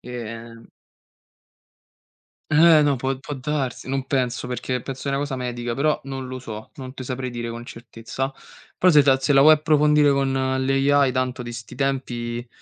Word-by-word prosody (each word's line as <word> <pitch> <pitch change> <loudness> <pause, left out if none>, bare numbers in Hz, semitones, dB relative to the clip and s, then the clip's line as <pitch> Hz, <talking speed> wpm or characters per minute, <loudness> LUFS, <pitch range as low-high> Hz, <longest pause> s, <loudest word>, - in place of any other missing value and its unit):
E, 125 - -11
ehm 115 -1 -8 1.8
Eh, 160 0 +6
no, 145 -3 +2
può 135 +1 -2
può 145 - -7
darsi, 135 -2 -3
non 135 0 -2
penso, 125 -3 -1
perché 125 0 -3
penso 135 +2 -7
è - - 0
una 140 - 0
cosa 145 -2 -3
medica, 120 -1 -4
però 150 +3 +1
non 135 -1 -6
lo 130 0 -6
so, 110 -3 -9
non 130 -1 -8
te 130 - -8
saprei 130 0 -4
dire 120 -1 -5
con 120 +1 -7
certezza. 120 +3 -6 0.5
Però 185 0 +5
se 150 - +7
ta 135 -1 +4
se 135 +2 0
la 135 - +6
vuoi 155 +2 +8
approfondire 150 -1 +3
con 135 -1 +1
l'AI 135 +1 +2
tanto 130 0 -2
di 120 - -6
sti 115 -1 -9
tempi 120 -3 -3
130 Hz, 180 wpm, -23 LUFS, 120-140 Hz, 1.8 s, vuoi